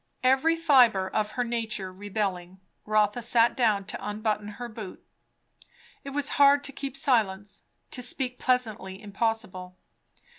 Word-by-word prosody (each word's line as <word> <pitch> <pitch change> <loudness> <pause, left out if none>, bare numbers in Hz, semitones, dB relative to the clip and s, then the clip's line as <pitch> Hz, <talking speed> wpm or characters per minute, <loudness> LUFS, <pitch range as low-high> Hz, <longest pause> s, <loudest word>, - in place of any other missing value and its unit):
Every 270 +6 +4
fibre 250 - +4
of 210 +1 -2
her 250 - 0
nature 225 -5 -3
rebelling, 190 -2 -4 0.3
Rotha 215 +2 +2
sat 235 0 +3
down 215 -6 +2
to - - -6
unbutton 210 0 -2
her 245 - -5
boot. 215 -4 -9 1.0
It 280 - -6
was 290 +1 -1
hard 280 0 +6
to 285 - -4
keep 275 0 -6
silence, 205 -7 0 0.3
to 250 - -4
speak 250 0 -3
"pleasantly" 220 -7 -1
impossible. 205 -3 -3
225 Hz, 135 wpm, -27 LUFS, 205-255 Hz, 1.0 s, hard